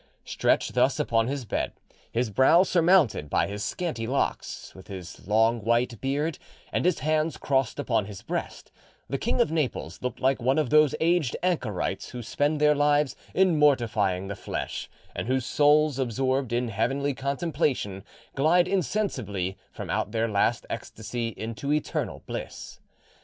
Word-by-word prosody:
Stretched - - +1
thus - - +2
upon 115 0 +2
his 135 -1 -3
bed, - - -2 0.4
his 115 -1 0
brow 130 - +6
surmounted 170 - +3
by - - +2
his 100 +1 -5
scanty 115 - -3
locks, 135 +3 -2
with 95 +1 -14
his 90 -3 -9
long 110 +3 +3
white 115 0 +1
beard, 145 +4 -1 0.3
and - - 0
his 180 -5 +2
hands 155 +2 +1
crossed 135 -4 0
upon 115 -7 0
his 100 -3 -9
breast, - - -5 0.4
the 135 - -2
King 240 - -1
of 235 - +3
Naples 155 -5 -2
looked 125 -2 -3
like 130 0 +1
one 130 +4 +2
of 150 -6 0
those 150 -2 +5
aged 165 -6 +2
anchorites 130 - -1
who 120 -1 -7
spend 145 +6 0
their 150 0 +5
lives 145 -1 +2 0.2
in 185 -5 +4
mortifying 110 -10 +2
the 100 - -4
flesh, - - -5 0.3
and - - -3
whose 130 -1 0
souls, 150 0 +3
absorbed 130 +1 0
in 120 0 0
heavenly 135 +7 0
contemplation, 135 - -1 0.3
glide 170 +6 +3
insensibly 130 - -1 0.2
from 95 -5 -6
out 105 +1 -1
their 115 0 0
last 110 +2 +1
ecstasy 115 +1 -4
into 115 +5 -4
eternal 150 0 -2
bliss. - - -7
130 Hz, 155 wpm, -26 LUFS, 110-150 Hz, 0.4 s, brow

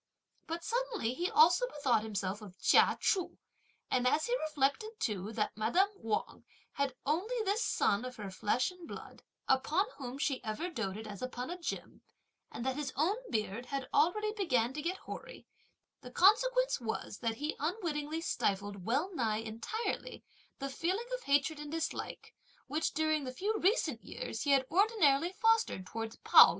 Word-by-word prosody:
But 335 +1 -4
suddenly 465 - -1
he 350 +7 -1
also 460 +3 +5
bethought 275 - +1
himself 205 -2 -3
of 195 -3 -12
Chia - - +5
Chu, 370 -4 +1 0.5
and 250 -1 +3
as 305 +4 +3
he 485 - +1
reflected 310 +10 0
too 210 -2 -2
that 210 -1 -1
madame 240 - +3
Wang 225 - -3 0.3
had 280 -2 -1
only 355 - 0
this 410 +4 +1
son 205 +4 +2
of 255 0 -6
her 215 - -8
own 200 - -4
flesh 210 - +1
and 360 -2 -12
blood, - - -9 0.3
upon 300 +9 +3
whom 260 -1 -5
she 275 -2 -1
ever 225 +12 -3
doated 220 - -3
as 205 -2 -8
upon 255 +2 -4
a 360 - -5
gem, - - -5 0.5
and 235 - -5
that 265 +1 0
his 290 -3 -2
own 330 +8 +2
beard 220 +1 -2
had 275 0 -3
already 425 +6 +3
begun 260 - +1
to 300 - -4
get 350 +4 -2
hoary, - - -9 0.6
the 250 - -9
consequence - - +4
was 220 -2 -4
that 230 -2 -1
he 295 +5 -3
unwittingly 315 -2 -2
stifled, 200 - -1
well 290 - 0
nigh 225 -8 0
entirely, 225 - -4 0.3
the 275 - -3
feeling 365 - -1
of - - -2
hatred 285 +2 +2
and 295 0 -7
dislike, 325 0 -4 0.3
which, 300 +2 -1
during 310 -1 +1
the 255 - -4
few 405 +12 -1
recent 340 - +1
years 220 - -5
he 290 - -1
had 270 -1 +5
ordinarily 350 -6 +4
fostered 450 - +2
towards 225 +3 -5
Pao - - +10
yü. - - +1
285 Hz, 170 wpm, -33 LUFS, 230-365 Hz, 0.6 s, Pao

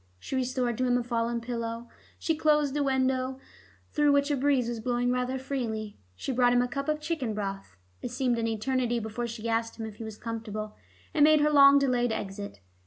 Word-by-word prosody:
She 265 - -6
restored 255 -2 -1
to 255 - +2
him 245 0 +3
a 245 - -1
fallen 235 0 -1
pillow, 230 0 -4 0.3
she 325 - 0
closed 300 -2 +2
a 295 - +1
window 265 -1 0 0.5
through 295 -1 +3
which 285 +1 +2
a - - +2
breeze 270 -2 +2
was 235 -1 -3
blowing 245 +1 0
rather 250 +1 -1
freely, 230 -6 -4 0.2
she 95 - -4
brought 245 -1 +3
him 245 - +4
a - - -1
cup 275 +3 -3
of 305 0 0
chicken 300 -8 -2
broth. 195 - -5 0.2
It - - -4
seemed 250 -1 0
an 230 - 0
eternity 240 +2 0
before 230 +1 -3
she 230 0 -6
asked 230 0 -1
him 225 - -3
if 215 -1 -9
he 225 - -7
was 220 -1 -7
comfortable, 215 -2 -5 0.4
and 300 - +4
made 305 0 +6
her 300 0 +3
long 280 -1 +8
delayed 250 -4 +2
exit. 200 - -5
245 Hz, 210 wpm, -28 LUFS, 230-270 Hz, 0.5 s, long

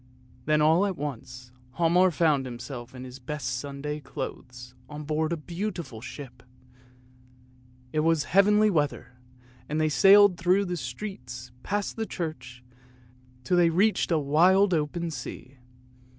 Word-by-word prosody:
" 125 0 -28
Then 150 0 +3
all 165 +6 +4
at 190 -3 -4
once 125 -3 -7 0.3
Hialmar 175 +2 +4
found 155 -6 +1
himself 120 0 -8
in 125 - -8
his 130 +1 -10
best 130 -2 -4
Sunday 145 +2 -5
clothes 125 -2 -8 0.2
on 150 0 -7
board 155 +2 -1
the 170 - -1
beautiful 170 - -5
ship; 125 -1 -10 1.5
it 155 - +1
was 160 -1 +2
heavenly 210 +3 +4
weather, 140 -6 -2 0.5
and 155 +2 -1
they 155 0 +2
sailed 195 +5 +6
through 185 +4 +2
the 180 -1 -3
streets, 125 - -7
past 205 - -3
the 220 -1 -2
church, 125 -7 -6 0.8
till 180 +8 +1
they 175 -1 +5
reached 195 +4 +2
a 165 - +3
wild 180 +7 +4
open 165 +2 -1
sea. 130 -1 -8
150 Hz, 140 wpm, -27 LUFS, 125-175 Hz, 1.5 s, sailed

